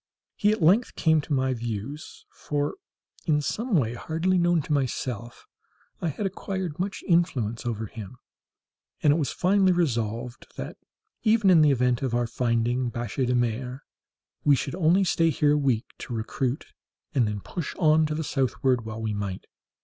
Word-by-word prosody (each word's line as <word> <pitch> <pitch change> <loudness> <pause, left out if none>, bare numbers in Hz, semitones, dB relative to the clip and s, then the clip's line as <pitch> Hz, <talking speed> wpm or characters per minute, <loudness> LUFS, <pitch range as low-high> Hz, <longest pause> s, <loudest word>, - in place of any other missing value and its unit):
He 210 -1 +3
at 215 -5 -1
length 200 +10 +4
came 160 -1 +3
into 150 +1 -3
my 130 -1 +1
views 120 +5 -6
(for 145 -1 -2 0.5
in 150 -2 +3
some 220 - -1
way, 120 -7 +2
hardly 165 +9 0
known 175 -2 +3
to 150 - -2
myself, 125 -4 -3 0.6
I - - 0
had 165 +7 -3
acquired 190 -3 -4
much 195 +2 -3
influence 130 - +1
over 110 -2 -2
him), 110 +2 -9 0.9
and 145 - +6
it - - +1
was 145 -6 -1
finally 190 +1 +3
resolved 120 -6 -1
that, - - -6 0.4
even 215 -3 +4
in 165 -3 +7
the 150 - +6
event 125 -2 +2
of 130 -3 -1
our 120 0 +1
finding 120 +1 0
biche 120 +2 -2
de 125 - +2
mer, 125 +2 -1 0.6
we 145 -1 +5
should 135 - -3
only 180 +2 +3
stay 165 -3 +2
here 150 -2 +2
a - - +3
week 130 -6 +1
to 120 - -5
recruit, 120 +4 -2 0.5
and 125 -6 +3
then 105 -1 -3
push 165 - -5
on 155 -1 +4
to 150 - -2
the 160 - -2
southward 130 -3 0
while 110 0 -5
we 110 -1 -1
might. 100 -2 -4
135 Hz, 170 wpm, -26 LUFS, 120-165 Hz, 0.9 s, in